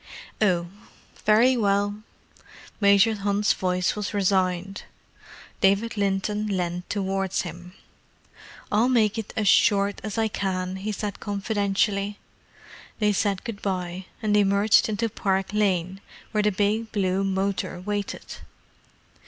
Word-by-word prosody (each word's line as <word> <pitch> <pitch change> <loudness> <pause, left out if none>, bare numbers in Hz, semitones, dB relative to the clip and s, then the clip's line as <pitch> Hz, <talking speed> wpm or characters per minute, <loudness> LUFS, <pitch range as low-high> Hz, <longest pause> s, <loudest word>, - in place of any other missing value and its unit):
"Oh, 175 -5 +2 0.6
very 230 +5 +5
well." 205 -1 0 0.8
Major 200 +2 +5
Hunt's 205 0 +1
voice 180 -1 0
was 210 0 -4
resigned. 190 -1 0 0.8
David 200 +5 +2
Linton 205 +1 -1
leaned 180 -3 -3
towards 195 -1 -1
him. 175 +1 -9 1.0
"I'll 220 +4 +3
make 225 -3 +2
it 220 - -6
as 215 -2 +1
short 200 0 +3
as 215 -1 -5
I 225 0 +2
can," 190 -2 -3
he 205 +3 -3
said 205 0 -4
confidentially. 205 0 -1 0.8
They 210 -1 +2
said 195 -1 0
good 220 -3 -6
bye, 185 -1 -3 0.2
and 210 -1 +2
emerged 205 +1 +4
into 220 +2 0
Park 195 -2 -1
Lane, 190 -2 0 0.3
where 215 - +1
the 210 0 +2
big 210 +3 0
blue 190 -2 0
motor 195 -1 -1
waited. 205 +2 -4
200 Hz, 120 wpm, -25 LUFS, 190-210 Hz, 1.0 s, very